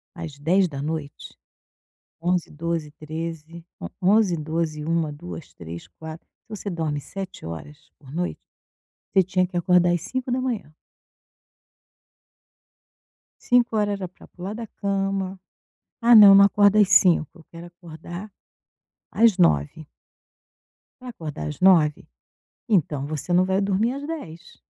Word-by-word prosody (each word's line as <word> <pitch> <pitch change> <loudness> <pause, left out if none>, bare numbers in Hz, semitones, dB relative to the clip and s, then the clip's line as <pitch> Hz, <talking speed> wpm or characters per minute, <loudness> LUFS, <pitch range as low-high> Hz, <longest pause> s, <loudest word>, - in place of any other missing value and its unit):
às 165 -5 -7
22h. 155 -3 -2 0.8
11, 175 0 0
12, 165 0 -3
13. 160 +1 -7 0.2
O 85 - -5
onze, 195 -1 +3
12, 155 -1 -3
1, 165 -1 0
2, 85 - -9
3, 85 0 -9
4. 160 0 -11 0.2
Se - - -56
você 210 -2 -6
dorme 160 -4 -2
7 190 +6 -8
horas 85 - -9
por 135 -3 -15
noite, 175 +3 -3 0.7
você 190 - +6
tinha 185 0 0
que 180 - -13
acordar 175 0 +3
às 175 - -1
5h. 250 - -3 2.7
5h 225 -4 +2
era 195 -2 -4
pra 180 - -17
pular 185 +3 -7
da 230 +1 -6
cama. 195 -2 -3 0.6
"Ah, 240 0 +5
não, 205 -2 +10
não 200 0 +8
acordo 205 +1 +4
às 210 -2 +6
5h 180 -3 +4
eu - - -16
quero 170 0 -10
acordar 175 +3 -10 0.8
às 225 -3 +4
9h". 155 - +2 1.2
Pra 255 - -9
acordar 155 - -6
às 75 - -7
9h, 165 -6 +4 0.6
então 150 -8 +1
você 150 +2 -5
não 180 +1 +4
vai 190 +1 +1
dormir 200 +4 +1
às 280 +2 -6
22h. 280 - -8
175 Hz, 130 wpm, -23 LUFS, 155-195 Hz, 2.7 s, não